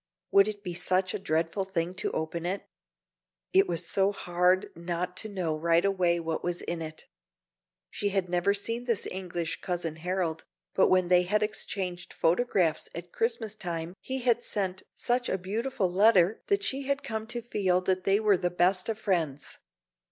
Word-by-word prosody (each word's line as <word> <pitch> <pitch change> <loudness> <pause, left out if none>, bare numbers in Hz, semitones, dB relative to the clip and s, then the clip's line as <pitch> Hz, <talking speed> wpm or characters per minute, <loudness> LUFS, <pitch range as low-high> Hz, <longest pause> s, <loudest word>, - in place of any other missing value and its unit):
Would 200 +1 +6
it 205 -1 -5
be 180 -3 -4
such 185 +2 +1
a - - -2
dreadful 165 +1 0
thing 180 -2 -2
to - - 0
open 160 +1 -3
it? 185 +3 -2 0.9
It 195 +1 +5
was 170 -2 -2
so 195 0 +2
hard 180 0 +1
not 175 +1 -3
to 220 - -3
know 180 -6 -1
right 165 +3 +2
away 180 -3 +2
what 165 -1 -3
was 175 0 -2
in 170 -1 -3
it. 155 -1 -7 0.9
She 205 - -1
had 195 -2 0
never 175 +2 +2
seen 230 +4 -2
this 235 -4 +1
English 175 -3 -3
Cousin 170 -3 -3
Harold, 175 -1 -2 0.3
but - - +4
when 185 -1 +3
they 180 -1 +6
had 210 +4 +1
exchanged 190 -4 -3
photographs 175 -3 +1
at 170 +1 -7
Christmas 225 -2 0
time 170 -3 -4
he 265 0 -3
had 240 -1 +2
sent 190 -3 -2
such 245 +1 0
a - - +1
beautiful 210 +2 -1
letter 195 0 +4
that 400 0 +2
she 270 0 -2
had 280 0 0
come 220 -1 -4
to 240 +1 -3
feel 195 -6 +1
that 185 0 0
they 195 +2 +3
were 210 -3 +4
the 180 0 0
best 180 +3 +2
of 220 - -1
friends. 165 -10 -1
185 Hz, 180 wpm, -29 LUFS, 175-210 Hz, 0.9 s, Would